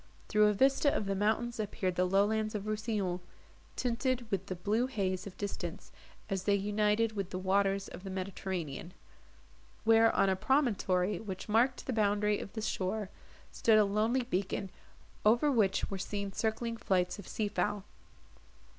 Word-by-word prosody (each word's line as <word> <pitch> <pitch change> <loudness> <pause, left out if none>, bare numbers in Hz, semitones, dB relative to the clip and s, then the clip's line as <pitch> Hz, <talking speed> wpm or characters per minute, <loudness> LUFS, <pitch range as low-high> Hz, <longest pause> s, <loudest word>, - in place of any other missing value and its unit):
Through 210 -1 +5
a 210 - +3
vista 270 +6 +3
of 210 - -1
the 195 - 0
mountains 220 +4 0
appeared 200 -3 -1
the 180 - +2
lowlands 215 +3 +1
of 205 - -2
Rousillon, 215 -4 -1 0.6
tinted 250 0 -1
with 195 -1 -1
the 185 - -3
blue 215 +7 0
haze 190 -6 -2
of 190 - -10
distance, 200 -1 -5 0.4
as 195 -2 -3
they 205 - +4
united 210 +2 +1
with 200 -4 -4
the 185 - -4
waters 195 +1 +1
of 180 - -10
the 195 - -6
Mediterranean; 185 -4 -4 0.9
where, 225 0 +6
on 195 - +4
a 190 - +2
promontory, 205 -6 +1
which 190 -4 -6
marked 240 +4 +2
the 260 - -2
boundary 210 -1 +2
of 200 - -8
the 220 - -4
shore, 205 -1 -2 0.4
stood 220 -2 +4
a 210 - +6
lonely 220 +5 +1
beacon, 195 -3 -2 0.5
over 235 +7 +4
which 200 -7 +1
were 195 - -3
seen 200 0 -4
circling 230 +2 -1
flights 185 -2 0
of 200 - -9
sea 215 - -1
fowl. 200 0 -1
205 Hz, 165 wpm, -32 LUFS, 190-220 Hz, 0.9 s, where